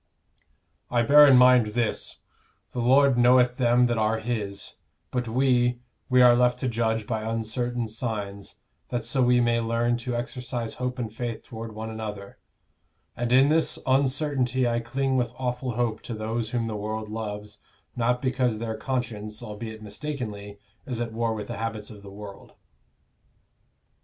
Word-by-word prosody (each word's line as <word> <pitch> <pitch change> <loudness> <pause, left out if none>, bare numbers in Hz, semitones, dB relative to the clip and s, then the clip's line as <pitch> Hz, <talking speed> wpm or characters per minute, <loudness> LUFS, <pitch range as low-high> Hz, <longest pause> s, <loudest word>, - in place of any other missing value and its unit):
"I 120 -1 +2
bear 145 +4 +8
in 135 -2 +7
mind 125 -4 +5
this: 120 -2 -2 0.5
the 125 - -4
Lord 130 +1 +4
knoweth 125 0 +5
them 120 0 +4
that 120 -2 0
are 110 +1 +1
His; 105 -4 -4 0.4
but 125 -1 -2
we 125 0 +2 0.3
we 125 -1 +6
are 120 -1 +7
left 125 0 +3
to 130 - 0
judge 115 -2 0
by 110 0 -2
uncertain 115 +2 -2
signs, 105 -3 -5 0.3
that 120 -2 -2
so 125 +3 +1
we 125 0 +4
may 120 0 +2
learn 115 +1 0
to 120 0 -4
exercise 120 -1 -4
hope 125 0 -3
and 115 -3 -4
faith 120 -1 -4
toward 115 -1 -8
one 110 +1 -5
another; 105 -3 -7 0.8
and 120 0 -2
in 135 +3 +6
this 160 +1 +2
uncertainty 130 -1 +1
I 120 0 +1
cling 130 +3 -1
with 120 -2 -1
awful 125 0 -2
hope 115 -2 -1
to 115 - -6
those 110 +1 -3
whom 115 -1 -1
the 110 -1 -3
world 110 +1 -4
loves 105 -1 -6 0.4
not 125 +1 0
because 125 -3 +1
their 110 0 -4
conscience, 110 -4 -4
albeit 110 +1 -7
mistakenly, 105 -3 -6 0.3
is 125 -3 -3
at 115 -2 -3
war 115 0 -1
with 105 -1 -5
the - - -6
habits 110 -2 -4
of 105 -2 -12
the 100 - -11
world. 100 0 -11
120 Hz, 160 wpm, -26 LUFS, 110-125 Hz, 0.8 s, bear